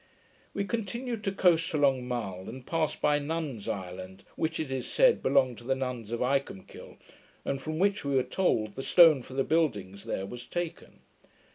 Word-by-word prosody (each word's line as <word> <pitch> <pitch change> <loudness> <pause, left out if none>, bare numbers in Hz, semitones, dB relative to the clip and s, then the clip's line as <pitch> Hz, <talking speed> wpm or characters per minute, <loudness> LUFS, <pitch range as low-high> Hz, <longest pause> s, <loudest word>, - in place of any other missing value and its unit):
We - - 0
continued 235 +1 -3
to 195 - +1
coast 170 -4 +3
along 135 -4 +2
Mull, 100 -7 -4
and 130 0 -9
passed 160 -2 -1
by 145 0 +3
Nuns' 145 -7 -4
Island, 95 0 -6
which, 160 - -1
it 155 -4 -3
is 130 -2 -2
said, - - +4
belonged 130 -4 +2
to - - -13
the 135 +2 0
nuns 125 -4 -4
of 120 - -2
Icolmkill, 135 -7 -3 0.5
and 135 - -2
from 155 +2 -4
which, 200 +3 +1
we 140 -1 -1
were 130 - +4
told, 110 - 0
the 135 - -5
stone 160 -2 +6
for 130 - -11
the 135 - +2
buildings 105 - 0
there 95 - -3
was 120 +4 -8
taken. 175 -2 -5
135 Hz, 180 wpm, -29 LUFS, 120-165 Hz, 0.5 s, stone